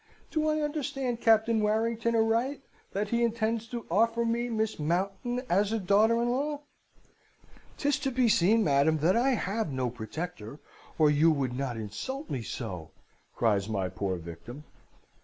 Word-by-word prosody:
Do 310 -1 +1
I 310 0 +1
understand 270 -5 -2
Captain 225 0 +4
Warrington 225 +2 +1
aright, 230 +5 +1 0.3
that 200 +1 -2
he 235 +1 +1
intends 230 0 0
to 235 -1 -6
offer 230 +4 +2
me 235 +1 0
Miss 220 -4 -1
Mountain 195 +10 -1
as 200 +4 +2
a 225 - +1
daughter 215 +4 +3
in 240 - 0
law?' 290 +3 -1 1.2
"''Tis 285 -1 +1
to 270 - -1
be 250 -1 +2
seen, 215 +2 +4
madam, 145 +1 +3
that 165 +5 +2
I 255 +2 +3
have 210 -4 -2
no 130 -2 -1
protector, 125 +2 -7 0.4
or 155 -2 +5
you 150 +3 +4
would 135 -5 0
not 130 -3 -3
insult 260 - -5
me 130 - -2
so!' 90 -9 -6 0.5
cries 105 -3 +1
my 95 -4 -1
poor 95 0 -2
victim. 85 - -9
215 Hz, 160 wpm, -29 LUFS, 140-235 Hz, 1.2 s, or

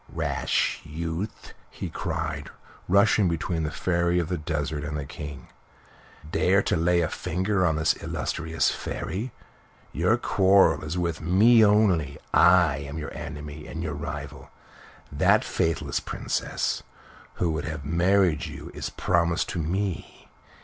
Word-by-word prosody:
"Rash - - 0
youth!" 85 +6 -5 0.2
he - - -6
cried, 80 -2 -3 0.4
rushing 100 0 +4
between 85 0 -2
the 75 - -1
Fairy 85 +1 0
of 85 -1 0
the 90 - -1
Desert 75 -1 -3
and 75 +1 -3
the 70 - -4
King. 75 -3 -8 0.8
"Dare 95 +1 +3
to - - +1
lay 85 +1 +2
a 80 - +1
finger 95 +4 -1
upon 80 -3 +2
this 80 +1 +2
illustrious 80 0 -1
Fairy! 110 +7 -4 0.6
Your - - +2
quarrel 95 -2 +4
is 75 +3 -4
with 85 -2 -2
me 110 +8 +5
only. 100 -9 +3 0.2
I 85 -5 +5
am 70 +2 -6
your 75 -1 -5
enemy 75 -2 -7
and 80 +1 -5
your 80 -3 -3
rival. 70 -2 -6 0.6
That - - +3
faithless 80 -1 -1
Princess - - -2 0.5
who 85 -2 0
would 80 -2 -3
have 75 -4 -5
married 85 0 +2
you - - -9
is - - -4
promised 85 0 +1
to 85 - -3
me. 90 +3 -3
85 Hz, 140 wpm, -26 LUFS, 75-90 Hz, 0.8 s, me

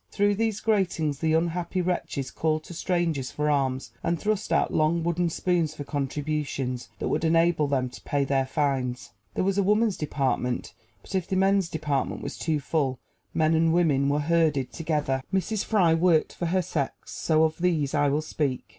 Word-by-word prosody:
Through 205 0 +2
these 220 0 -1
gratings 170 -9 0
the 160 0 +1
unhappy 170 +2 0
wretches 175 -6 -2
called 155 -1 0
to 175 - -10
strangers 165 -6 -1
for 150 0 0
alms, 130 -2 0
and 170 -1 0
thrust 215 0 -1
out - - +2
long 160 +2 +2
wooden 170 +1 +1
spoons 165 -2 0
for 145 - -5
contributions, 140 -3 -3
that - - -3
would - - 0
enable 165 -1 +3
them 135 -2 0
to - - -11
pay 145 -1 0
their 135 -1 +1
fines. 130 -4 -1 0.2
There - - +1
was 195 +1 +1
a - - +3
woman's 210 +1 +2
department; 130 -4 -1 0.3
but - - -11
if 190 -2 0
the 190 - -1
men's 195 -1 +3
department 150 -4 -2
was - - -5
too 160 -2 0
full, 140 -3 -1 0.4
men 160 0 +3
and 165 0 +3
women 140 -6 +3
were 145 +1 +1
herded 150 -6 +1
together. 150 -2 -1
Mrs. 195 +2 0
Fry 185 -7 +3
worked 165 -1 +3
for 175 - -3
her 185 +2 +1
sex, 150 -5 -4
so 160 -1 +2
of 160 0 0
these 165 -6 +1
I 145 -1 +3
will 150 +2 0
speak. 140 -4 -2
160 Hz, 185 wpm, -26 LUFS, 140-175 Hz, 0.4 s, enable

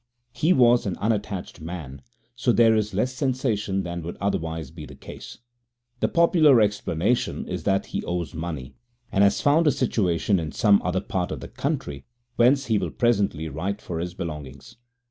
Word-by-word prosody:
He 150 +8 +1
was 120 - +4
an 90 - -3
unattached 105 -5 -3
man, 80 -5 -7 0.3
so 120 0 +1
there 115 -1 +5
is 105 -2 -1
less 125 +6 0
sensation 120 -7 -1
than 85 -1 -5
would 85 +2 -7
otherwise 80 -6 -2
be 80 -1 -10
the 70 - -12
case. - - -10 0.6
The - - +2
popular 160 -6 +5
explanation 105 +1 0
is - - -5
that 95 0 +1
he - - -4
owes 90 -1 -3
money, 80 -5 -5 0.4
and 100 - +3
has 100 0 +3
found 155 +3 +4
a - - +6
situation 100 -7 +1
in 80 -2 -5
some 100 -2 +4
other 90 +1 0
part 90 -2 -3
of - - -4
the - - -8
country, 70 -1 -3 0.3
whence 130 +4 +4
he 110 -3 +1
will - - -2
presently 100 - 0
write 100 +5 -3
for 85 -5 -5
his 90 +1 -4
belongings. 75 -7 -7
100 Hz, 175 wpm, -24 LUFS, 85-120 Hz, 0.6 s, a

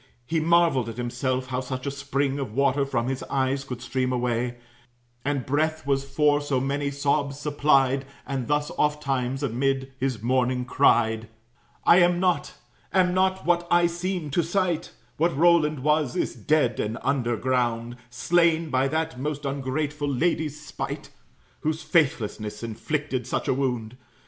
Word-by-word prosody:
He 165 +5 0
marveled 165 -7 +3
at 115 - -8
himself, 130 +1 -2
how 125 -1 -1
such 130 0 -5
a 140 - -1
spring 140 0 -1
Of 130 -6 -4
water 140 +1 +2
from 120 -3 -1
his 135 0 -2
eyes 135 0 0
could 125 -2 -7
stream 130 0 -1
away, 120 -1 -1 0.7
And 140 -3 -1
breath 155 +2 0
was 135 -1 +1
for 145 +1 +2
so 145 -3 0
many 140 +2 -1
sobs 140 0 0
supplied; 140 -2 +2 0.2
And 135 -3 -3
thus 145 0 0
oft 150 0 +1
times, 135 0 -1
amid 135 +1 -1
his 130 -5 -2
mourning, 125 0 +1
cried: 110 -3 +2 0.6
"I 170 - +7
am 175 0 +4
not 180 -1 0 0.4
am 180 -1 +3
not 190 0 +1
what 175 0 +2
I 175 0 +5
seem 175 -2 -2
to 170 - +2
sight: 175 0 -1 0.3
What 165 -2 +1
Roland 155 -3 +4
was, 150 -3 +2
is - - -1
dead 150 -6 +1
and 110 +2 -2
under 125 -4 0
ground, 120 -1 0
Slain 165 +5 +2
by 130 +1 +2
that 160 -2 -2
most 145 +1 -3
ungrateful 145 +2 -2
lady's 155 +1 0
spite, 150 -3 -6 0.5
Whose 155 +1 -2
faithlessness 115 - 0
inflicted 130 +3 -3
such - - -2
a - - +3
wound. 125 -3 -2
140 Hz, 155 wpm, -25 LUFS, 125-155 Hz, 0.7 s, I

